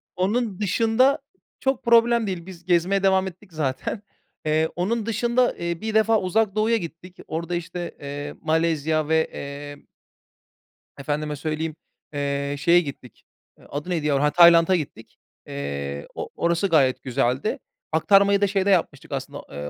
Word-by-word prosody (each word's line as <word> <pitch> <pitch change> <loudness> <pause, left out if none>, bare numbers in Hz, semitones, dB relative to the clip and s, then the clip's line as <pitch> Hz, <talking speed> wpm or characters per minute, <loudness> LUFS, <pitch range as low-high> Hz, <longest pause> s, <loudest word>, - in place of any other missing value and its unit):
Onun 205 +2 -1
dışında 225 +7 +3 0.4
çok 265 -1 0
problem 235 -1 +4
değil, 180 -3 -4
biz 180 -2 -11
gezmeye 185 +2 +2
devam 190 0 +3
ettik 185 0 -12
zaten. 155 +8 -3 0.4
Eee, 155 +1 +2
onun 210 +5 -1
dışında, 240 +2 +1
eee, 170 -1 -3
bir 220 0 -3
defa 220 0 +3
Uzak 205 +2 +1
Doğu'ya 225 +2 +2
gittik. 175 0 -9
Orada 170 +2 -3
işte, 175 0 -5
eee, 145 +1 -6
Malezya 160 -1 +1
ve, 160 0 +3
eee 145 +1 -8 1.1
efendime 150 +1 -3
söyleyeyim, 155 +1 -3 0.4
eee, 140 0 -2
şeye 170 +4 +5
gittik, 135 -6 -10 0.5
adı 150 +5 -5
neydi 165 -4 -1
ya, 140 0 +2
heh 150 - +2
Tayland'a 170 +1 +7
gittik. 140 -8 -6 0.3
Eee, 70 0 -5
o - - -5
orası 170 +3 +1
gayet 140 -7 +2
güzeldi. 130 - 0 0.3
Aktarmayı 200 +5 +4
da 200 - +4
şeyde 195 0 0
yapmıştık 165 -4 0
aslında, 140 +1 -5
eee, 75 0 -6
170 Hz, 145 wpm, -24 LUFS, 145-200 Hz, 1.1 s, Tayland'a